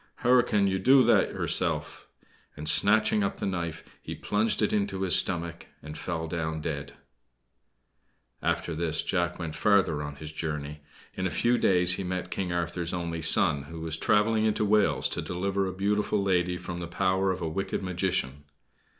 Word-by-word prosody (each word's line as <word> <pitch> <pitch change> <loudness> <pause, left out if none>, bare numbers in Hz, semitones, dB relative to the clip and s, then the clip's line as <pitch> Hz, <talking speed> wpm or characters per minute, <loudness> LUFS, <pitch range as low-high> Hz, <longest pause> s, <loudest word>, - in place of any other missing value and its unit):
"Hur 125 +1 +5
can 105 -4 +1 0.2
do 130 +4 +6
that 120 - +3
hurself!" - - 0 0.5
and, 75 +1 -7
snatching 105 +5 +3
up 100 - -2
the - - -4
knife, 85 -4 -3 0.2
he - - -7
plunged 105 +1 0
it 105 - +1
into 100 -2 -1
his 90 -4 +5
stomach 85 -2 0 0.2
and 75 0 -8
fell 80 0 -4
down 80 -1 -3
dead. 70 -3 -5 1.5
After 85 - -1
this, 80 0 0
Jack 85 -2 -1
went 80 -3 -5
farther 95 -8 +2
on 75 -1 -6
his 75 +1 -9
journey. 75 -2 -5 0.3
In 95 - -2
a - - -3
few 120 +9 +1
days 90 -5 +3
he - - -4
met 90 0 -4
King 90 -2 -3
Arthur's 85 0 -2
only 85 -2 -4
son, 70 -2 +4
who 80 +2 -9
was 80 -1 -3
traveling 105 +5 +2
into 110 0 +1
Wales 100 -10 +2
to - - -3
deliver 95 +2 -2
a - - -3
beautiful 100 +2 0
lady 90 -2 +1
from 90 -1 -7
the 85 - -5
power 95 +2 0
of 95 - -4
a 85 - -3
wicked 95 +5 -3
magician. 85 -7 -2
90 Hz, 175 wpm, -27 LUFS, 80-100 Hz, 1.5 s, do